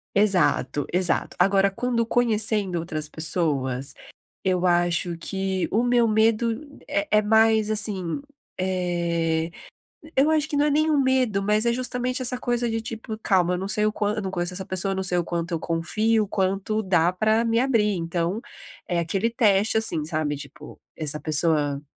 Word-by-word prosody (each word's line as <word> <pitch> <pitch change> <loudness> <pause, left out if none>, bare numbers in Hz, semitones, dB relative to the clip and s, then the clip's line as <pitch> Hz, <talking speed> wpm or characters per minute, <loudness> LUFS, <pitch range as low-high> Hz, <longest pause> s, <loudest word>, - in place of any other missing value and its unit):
Exato, 195 -7 +2
exato, 180 -1 0
agora 195 +2 +3
quando 230 +3 -2
conhecendo 215 -6 +2
outras 155 -2 -3
pessoas, 140 -6 0 0.5
eu 185 -1 0
acho 175 0 +1
que 190 +1 -3
o 225 +3 +1
meu 245 -1 +2
medo 225 +5 0
é 300 +1 -2
é - - +1
mais, 220 0 +3
assim, 210 -3 -1 0.4
eh, 170 -3 -1 0.7
eu 280 +3 +4
acho 310 -1 0
que 290 - -2
não 290 - +3
é - - +2
nem 305 +2 +1
um 295 - +2
medo, 255 -6 +1
mas 210 +3 +1
é 235 - +3
justamente, 250 +1 -2
essa 250 0 +1
coisa 240 -1 -1
de 225 0 -2
tipo 220 -1 -7
calma, 180 -3 +2
eu - - -1
não 190 +2 -4
sei 210 0 +4
o 215 - 0
quan 210 0 -2
não 190 -2 -4
conheço 175 -1 -2
essa 190 +1 -5
pessoa, 185 +1 0
não 190 - -2
sei 180 -1 +5
o 175 - +1
quanto 170 0 -4
eu 165 - -1
confio, 215 +7 0
quanto 195 +2 -1
dá 180 -2 +2
pra 215 +4 +1
me 230 0 +1
abrir, 230 -5 +1
então, 170 +4 -3 0.5
é 175 - -1
aquele 195 +6 -1
teste, 215 -2 +2
assim, 195 -8 +2
sabe, 155 -2 -2
tipo, 145 +1 -11 0.2
essa 150 -1 +1
pessoa, 150 -3 +3
eh, - - -28
195 Hz, 175 wpm, -23 LUFS, 175-225 Hz, 0.7 s, sei